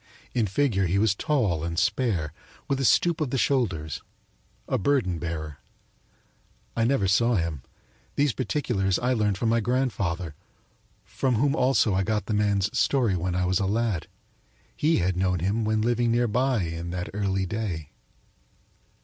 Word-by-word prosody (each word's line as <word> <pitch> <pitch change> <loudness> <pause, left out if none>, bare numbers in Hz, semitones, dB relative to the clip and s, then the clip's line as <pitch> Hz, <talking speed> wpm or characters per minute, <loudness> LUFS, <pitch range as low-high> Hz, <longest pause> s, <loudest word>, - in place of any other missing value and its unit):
In 115 -4 +1
figure 100 -3 +1
he 90 +3 +1
was 105 -1 +3
tall 100 - 0
and 85 0 -3
spare, 100 - 0 0.3
with 135 -1 0
a 135 - 0
stoop 170 +5 +3
of 150 - 0
the 135 - -1
shoulders 105 - 0 0.7
a - - 0
burden 100 - +1
bearer. 80 -3 -5 1.2
I 115 - +2
never 115 -6 +2
saw 115 +5 +3
him; 85 -6 -1 0.5
these 140 -3 +2
particulars 110 -7 0
I 125 +1 +1
learned 105 -4 +1
from 115 - 0
my 115 +1 +3
grandfather, 100 - -1 0.7
from 130 -2 -1
whom 140 +5 +2
also 125 -7 +3
I 95 - +2
got 105 +2 -1
the 110 - -2
man's 105 +1 +1
story 115 -2 +2
when 90 0 -2
I 90 0 +1
was 90 +1 +1
a 100 - 0
lad. 110 -4 -1 0.7
He 160 +2 +2
had 90 0 +1
known 90 0 +1
him 100 +6 0
when 110 0 +1
living 120 0 +1
near 120 +1 +2
by 125 -1 +1
in 85 +1 -4
that 90 0 -4
early 95 -2 0
day. 90 -7 -4
105 Hz, 165 wpm, -26 LUFS, 90-120 Hz, 1.2 s, was